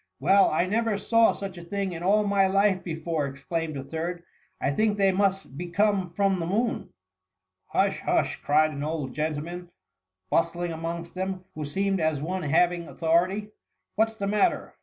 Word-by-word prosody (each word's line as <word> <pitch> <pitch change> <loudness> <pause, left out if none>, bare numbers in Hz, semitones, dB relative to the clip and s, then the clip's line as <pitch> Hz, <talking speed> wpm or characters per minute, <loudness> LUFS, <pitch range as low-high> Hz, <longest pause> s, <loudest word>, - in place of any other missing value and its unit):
^ - - -45
" - - -55
Well, 195 +1 +5
I 155 +3 +1
never 220 +2 0
saw 230 +2 +4
such 195 -3 -6
a - - -10
thing 195 +2 -3
in 170 -1 -6
all 205 +4 +3
my 200 -1 +3
Mk 195 0 +2
before 160 -2 -2
T - - -4
exclaimed 155 +3 -4
a 135 - -5
third; 170 +4 -4 0.2
" - - -39
I 135 - 0
think 210 +7 +1
they 195 -1 +4
must 195 -5 0
be 175 +5 -5
come 200 0 +1
from 195 +2 +1
the 165 - -2
moon.'" 225 +6 0
^^ - - -24 0.8
Hush! - - +1
hush,^ - - 0
cried 155 +2 +3
an 140 -1 -5
old 150 -3 -3
gentleman 160 +3 -3 0.6
bustling 170 +1 +1
amongst 165 +1 -5
them, 185 0 -4
who 155 -1 -5
seemed 195 +6 0
as 160 -3 +1
one 180 +6 -3
hav 170 +3 +3
ing 170 -1 -6
authority. 180 +6 +1 0.4
"What's 220 +1 +1
the 200 - -3
matter? 210 - +1
180 Hz, 195 wpm, -26 LUFS, 160-200 Hz, 0.8 s, Well